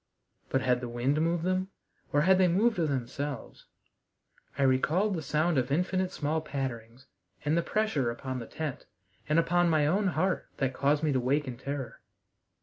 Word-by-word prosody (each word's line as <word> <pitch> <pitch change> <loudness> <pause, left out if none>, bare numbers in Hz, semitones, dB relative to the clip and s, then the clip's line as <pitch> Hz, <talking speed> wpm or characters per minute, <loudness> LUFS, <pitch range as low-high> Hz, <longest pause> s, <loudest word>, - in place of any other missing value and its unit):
But 135 - +1
had 125 -1 +2
the 120 - -4
wind 130 +6 0
moved 165 0 +1
them, 185 +1 0 0.4
or 145 - +3
had 185 +3 +5
they 185 - +5
moved 200 +4 +2
of 160 -3 +1
themselves? 135 0 -4 0.9
I 140 - +2
recalled 155 +10 +2
the 165 - -2
sound 155 +1 +1
of 125 +1 -2
infinite 180 +4 0
small 155 +2 -1
patterings 130 -5 -5 0.4
and 150 +2 +2
the 170 - +3
pressure 170 - 0
upon 130 +2 -4
the 115 - -7
tent 155 -4 -5 0.4
and 150 - +3
upon 175 +1 +3
my 155 -2 +3
own 195 +7 +2
heart 185 0 0
that 135 -2 0
caused 145 +3 +1
me 155 - +2
to 130 - +2
wake 140 +3 +1
in 125 - -4
terror. 135 -2 -6
150 Hz, 180 wpm, -29 LUFS, 130-175 Hz, 0.9 s, had